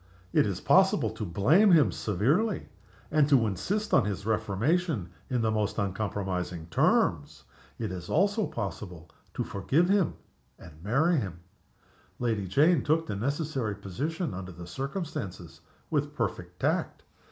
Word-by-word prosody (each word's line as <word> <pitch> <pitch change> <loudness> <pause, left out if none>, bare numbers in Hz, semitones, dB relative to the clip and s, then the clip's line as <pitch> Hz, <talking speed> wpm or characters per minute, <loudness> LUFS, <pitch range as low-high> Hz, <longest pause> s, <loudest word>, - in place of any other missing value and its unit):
It - - +4
is - - -3
possible - - +4
to - - -6
blame 125 - +4
him 155 -4 +5
severely, 145 - 0 0.4
and 150 -1 +3
to 130 -5 +5
insist 190 - -2
on - - +6
his 100 -1 -3
reformation 110 - 0 0.2
in 125 -3 0
the 110 - +2
most 105 -1 -1
uncompromising 95 -4 -2
terms. - - +1 0.3
It - - -3
is 90 -1 -7
also 200 +5 +2
possible 90 -4 -6 0.2
to - - -1
forgive 150 - +1
him, 200 -3 +2 0.4
and 85 - -13
marry 145 - +2
him. 95 - -4 0.8
Lady 110 -5 -1
Jane 150 - +4
took 160 +2 +2
the 105 - -4
necessary 135 -1 -2
position 140 - -3
under 95 0 -6
the 85 0 -9
circumstances 100 - -5 0.3
with 145 -1 -1
perfect 90 -7 -3
tact. - - -1
110 Hz, 140 wpm, -28 LUFS, 95-155 Hz, 0.8 s, on